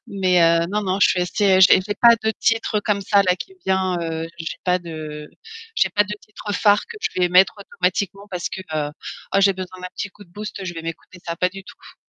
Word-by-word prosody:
Mais, 185 -2 +2
heu, 165 0 +4
non, 210 +1 -1
non, 190 -1 -1
je - - +6
suis 180 - +1
assez, 190 +2 +2
heu, - - +3
j'ai 190 +2 +5
pas 235 -1 +8
de 220 - +2
titre, 225 -1 +1
heu, - - +2
comme 205 -1 0
ça, 200 +1 +4
là, 180 -1 +2
qui 380 - -9
vient 190 -1 +1
heu, 165 -1 -3
j'ai 165 -1 -5
pas 180 0 +2
de 155 -3 -8 0.5
j'ai - - +2
pas 205 -1 +3
de 205 0 -5
titres 210 0 -8
phares 205 -1 +3
que 465 - -10
je - - -1
vais 180 - +3
mettre 185 +2 +5
automatiquement 195 +1 -2
parce 180 -2 -3
que, - - -6
heu: 150 -1 -1 0.4
«Oh - - +5
j'ai 195 0 +5
besoin 185 -1 -8
d'un 180 - -6
petit 205 - -4
coup 205 - -16
de 175 - -26
boost, 205 +1 -7
je 180 - -4
vais 165 - -6
m'écouter 165 +2 -8
ça». 170 0 -4
Pas 180 +1 +2
du 195 0 -10
tout. - - -15
185 Hz, 250 wpm, -21 LUFS, 175-205 Hz, 0.5 s, pas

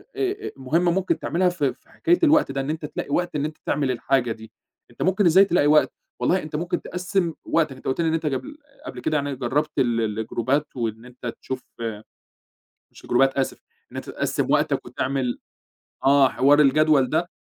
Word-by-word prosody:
آآ 400 +1 -2
مهمة 165 +7 +1
ممكن 190 +1 0
تعملها 180 +1 +1
في 145 -7 -1
في - - -30
حكاية 350 +1 +1
الوقت 305 - +4
ده، 135 0 -2
إن 135 - -4
أنت 155 -1 -3
تلاقي 145 - -5
وقت 175 +2 -1
إن 145 0 0
أنت 155 0 -6
تعمل 140 -3 0
الحاجة 125 0 0
دي، 110 0 -8 0.4
أنت - - -12
ممكن 190 +2 +2
إزاي 185 +4 +7
تلاقي 170 -6 +2
وقت، 150 0 +4 0.3
والله 185 +1 +2
أنت 155 -1 -7
ممكن 175 +2 -2
تقسّم 180 -2 -1
وقتك، 155 -5 +1
أنت 130 - -17
قُلت 135 +5 0
لي 165 - +1
إن 160 - +1
أنت 165 0 -1
جبل 260 - -3 0.3
قبل - - -7
كده 155 -1 0
يعني 140 -1 -2
جربت 140 +5 -1
ال 120 -2 +2 0.2
الجروبات 130 +6 0
وإن 115 -1 -3
أنت 125 -1 -7
تشوف 130 -1 -5 1.3
مش - - -16
الجروبات 135 +2 +2
آسف، 135 - -2 0.3
إن - - -9
أنت - - -6
تقسّم - - -1
وقتك - - +1
وتعمل 130 -2 -2 0.7
آه، 135 -1 +5
حوار 145 +3 +4
الجدول 145 -2 +4
ده. 170 +2 0
150 Hz, 190 wpm, -23 LUFS, 130-175 Hz, 1.3 s, إزاي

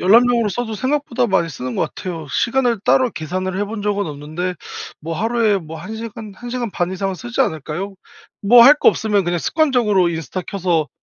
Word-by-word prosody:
열람용으로 235 +3 +4
써도 225 +1 -3
생각보다 260 0 0
많이 190 -5 +1
쓰는 130 -4 -5
것 - - -1
같아요. 165 -4 -6
시간을 240 - +1
따로 255 -2 +3
계산을 185 +3 -3
해 205 - +1
본 215 -1 -5
적은 205 -2 0
없는데 155 +5 -4 0.5
뭐 165 +2 -4
하루에 225 -2 +2
뭐 160 -2 -9
1 195 +7 -7
시간, 220 -2 -7
1 245 +5 -9
시간 240 -2 -3
반 175 -1 -1
이상은 195 +1 -2
쓰지 120 -9 -4
않을까요? 160 +6 -2 0.5
뭐 235 +4 +8
할 285 +4 +9
거 - - +6
없으면 210 -3 +1
그냥 175 0 0
습관적으로 235 - +2
인스타 165 +2 -4
켜서 175 -6 0
200 Hz, 385 characters per minute, -19 LUFS, 175-235 Hz, 0.5 s, 할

